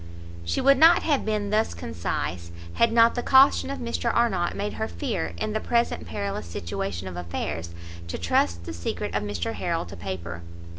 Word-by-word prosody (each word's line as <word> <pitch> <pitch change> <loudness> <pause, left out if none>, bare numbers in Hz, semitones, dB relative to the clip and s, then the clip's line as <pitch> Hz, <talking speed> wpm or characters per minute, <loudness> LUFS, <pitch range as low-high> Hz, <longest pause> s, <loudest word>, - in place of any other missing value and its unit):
She 85 0 -1
would 275 -1 +5
not 330 +2 +7
have 290 -4 +1
been 210 -2 -1
thus 215 - +1
concise, 85 +1 -4 0.2
had 230 -1 +3
not 230 0 +6
the 245 - -2
caution 265 - +5
of 95 - -3
Mr 80 +1 -1
Arnott 195 -7 +1
made 205 +1 -3
her - - -2
fear, 85 -1 -3
in 210 - -2
the 215 - 0
present 235 - 0
perilous 100 +2 -4
situation 95 +1 -4
of 90 - -6
affairs, 85 -1 -4 0.4
to 85 - -4
trust 85 0 +1
the - - -5
secret 85 +1 -4
of - - 0
Mr 100 -4 -3
Harrel - - -2
to - - -10
paper. 85 -2 -6
95 Hz, 185 wpm, -26 LUFS, -, 0.4 s, not